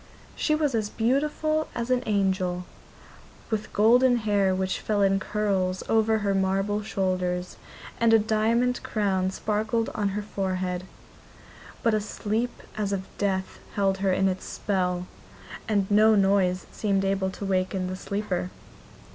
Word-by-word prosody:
She 305 - +1
was 300 -3 0
as 215 -2 0
beautiful 300 +7 0
as 235 +1 -2
an 250 -1 +3
angel, 190 -3 0 0.9
with 215 -1 -2
golden 245 +4 +5
hair 205 -4 +2
which 190 0 -1
fell 205 -2 0
in 195 0 +3
curls 190 -3 -1
over 220 0 +3
her 200 - +2
marble 195 +2 0
shoulders, 185 -3 -2 0.4
and 230 -1 +4
a 225 - +8
diamond 225 +3 +1
crown 190 -3 0
sparkled 220 +3 -1
on 205 -1 0
her 210 - -2
forehead. 185 -3 -2 1.0
But 230 -2 +3
a 215 - +2
sleep 220 +3 -3
as 210 -2 -2
of 190 -1 -2
death 190 -2 -1 0.2
held 195 -1 +1
her 195 -1 +1
in 190 +1 +2
its 185 0 -2
spell, 180 -3 -1 0.6
and 205 -3 +2
no 215 +1 +6
noise 195 -2 +2
seemed 195 -2 0
able 195 -1 0
to 200 - -6
waken 185 0 0
the 185 0 -3
sleeper. 190 -2 -3
200 Hz, 145 wpm, -26 LUFS, 190-220 Hz, 1.0 s, a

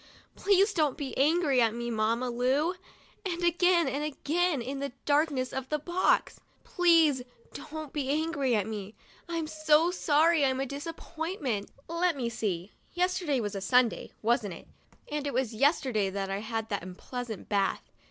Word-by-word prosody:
" - - -30
Please 400 +1 +3
don't 305 -7 +1
be 275 -3 -5
angry 290 -2 +3
at 225 -1 +2
me, 240 0 -3
Mamma 230 +3 0
Lu! 265 +8 +1 0.3
" - - -30
and 350 -3 -3
again 345 -1 +3
and 275 +3 -2
again, 305 +2 0
in 265 +4 -4
the 280 -2 -4
darkness 285 -3 +1
of 265 0 -4
the 300 - +1
box, 345 +5 +1
" - - -37
Please 330 -6 +4 0.3
don't 310 -1 -7
be 280 -3 -2
angry 285 -4 +1
at 205 -3 +1
me, 210 -1 -6 0.3
I'm 335 -2 -2
so 310 +2 +3
sorry 320 -2 +3
I'm 260 -1 +2
a 270 - 0
disappointment." 290 - -4 0.2
Let 335 -1 0
me 240 -3 -1
see. 195 -5 -3 0.2
Yesterday 360 -6 +1
was 205 -3 -3
Sunday, 250 +1 +2
wasn't 220 -4 +1
it? - - -14 0.4
and 295 -1 -2
it 280 - -3
was 250 -3 0
yesterday 245 - +2
that 195 0 -3
I 195 - -1
had 225 +1 -4
that 200 - -2
unpleasant 220 +5 -7
bath. 200 -2 0
280 Hz, 170 wpm, -29 LUFS, 235-325 Hz, 0.4 s, Please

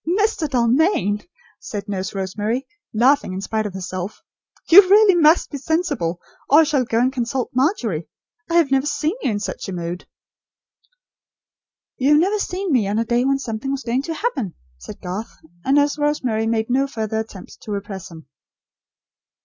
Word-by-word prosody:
'" 380 - +1
"Mr. 415 -7 +1
Dalmain," 240 - +2 0.4
said 205 -3 -6
Nurse 195 -1 -4
Rosemary, 210 +7 -2 0.3
laughing, 250 -2 +2
in 190 - -4
spite 215 +2 -2
of 195 - -9
herself, 185 +2 -6 0.4
"you 365 +4 +10
really 415 0 +7
must 325 -1 +4
be 285 - -5
sensible, 285 - -1 0.3
or 295 +4 +7
I - - +5
shall 290 -5 +1
go 225 - -1
and 255 +3 +2
consult 250 0 -2
Margery. 245 - 0 0.4
I 335 - 0
have 330 -5 +4
never 270 +1 +2
seen 305 +2 0
you - - 0
in 205 -2 -1
such 205 - -5
a - - -4
mood." 175 0 -5 1.9
"You 275 +3 +3
have 295 - +6
never 400 +5 +1
seen 375 -1 -3
me, 235 -7 +2
on 205 +2 -1
a 230 - +1
day 240 +2 +1
when 275 0 +2
something 245 -1 -5
was 275 0 -3
going 240 +3 0
to 325 +3 -5
happen," 300 - -2 0.2
said 65 - -10
Garth; 190 +5 -6 0.3
and 270 - +2
Nurse 290 +1 +2
Rosemary 255 -7 0
made 225 +1 -1
no 270 +2 +2
further 220 -4 -3
attempt 215 -4 -9
to 215 - -8
repress 200 -2 -5
him. 160 -2 -12
245 Hz, 180 wpm, -21 LUFS, 205-295 Hz, 1.9 s, you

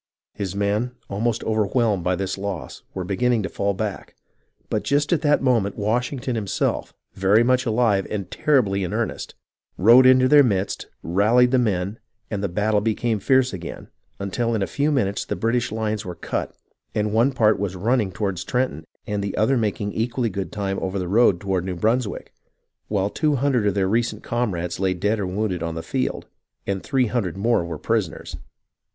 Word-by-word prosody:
His 100 -3 -4
men, 105 +5 0 0.2
almost 115 +3 -1
overwhelmed 110 -2 +1
by 90 +1 +1
this 95 0 -2
loss, 100 -3 -5
were 95 - -2
beginning 115 +5 +1
to 95 - -3
fall 100 0 -1
back; 105 0 -5 0.5
but - - -1
just 145 +3 +1
at 165 - +1
that 145 -3 +2
moment 115 -6 +1
Washington 125 +5 -1
himself, 105 -5 -1 0.2
very 100 +4 +4
much 130 +1 +2
alive 110 -4 +2
and 100 -3 -4
terribly 105 -10 +2
in 90 - -3
earnest, 110 -2 -3 0.4
rode 120 +6 +7
into 130 0 +6
their 145 +2 +7
midst, 100 -7 0 0.2
rallied 110 +8 +3
the 130 - +4
men, 100 -2 -1 0.3
and 105 -2 -2
the 100 - 0
battle 105 +3 +1
became 110 0 0
fierce 130 +3 +3
again, 85 -3 -7 0.3
until 115 +4 -1
in 105 - 0
a - - +1
few 145 +7 0
minutes 100 -8 0
the - - -3
British 120 +1 0
lines 110 -1 -2
were 90 -3 -6
cut - - -4 0.4
and 105 0 0
one 115 +5 +3
part 110 -6 +3
was 100 -2 -2
run 115 +8 +1
ning 100 -4 -1
toward 95 0 -2
Trenton 95 - -2 0.2
and 105 -1 -2
the 100 - -4
other 110 +6 +3
making 105 -3 -1
equally 120 0 -1
good 95 -3 -4
time 100 -2 -2
over 95 +1 -3
the 90 -2 -2
road 105 -2 +4
toward 95 -2 -1
[New] 90 -1 -3
Brunswick, 110 +4 -1 0.5
while 100 -1 0
two 150 -2 +1
hundred 130 -5 +1
of 100 - +1
their 95 -2 +1
recent 110 +1 0
comrades 95 -9 -2
lay 95 -1 +1
dead 105 +5 0
or 100 - -1
wounded 95 -2 -2
on 85 -1 -3
the 80 - -5
field - - -2 0.4
and 95 -1 -2
three 135 -2 +1
hundred 105 -6 -2
more 115 -1 +2
were 85 -2 -5
prisoners. 105 -1 -2
105 Hz, 185 wpm, -23 LUFS, 95-120 Hz, 0.5 s, rode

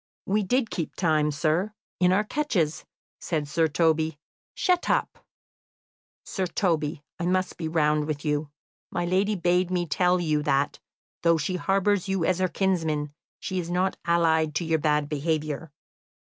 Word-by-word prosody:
"We 210 +2 +1
did 230 +4 0
keep 165 -4 -3
time, 155 -4 +2
sir, 160 +7 0 0.3
in 180 0 +4
our 200 +3 +3
catches," 210 - -1 0.3
said 155 -4 -2
Sir 160 +2 +2
Toby. 160 0 +1 0.4
"Shut 360 -2 +1
up!" - - 0 1.0
"Sir 190 -2 -2
Toby, 160 -6 -1 0.2
I 175 - -1
must 185 0 0
be 165 - -4
round 150 -2 +1
with 150 -1 -4
you. 150 0 0 0.4
My 175 - -2
lady 195 +4 +1
bade 180 0 +2
me 180 -1 0
tell 180 +3 +2
you 155 -3 +1
that, 140 -1 0 0.4
though 170 -1 +4
she 160 +4 -2
harbours 195 +1 +1
you 190 -3 0
as 185 -1 +1
her 185 - +2
kinsman, 160 -6 -1 0.3
she 185 -1 -3
is 170 -1 -4
not 185 +2 +1
allied 160 -3 +2
to 170 - 0
your 160 -1 +1
bad 150 -1 +1
behaviour. 155 0 -2
170 Hz, 160 wpm, -26 LUFS, 150-185 Hz, 1.0 s, in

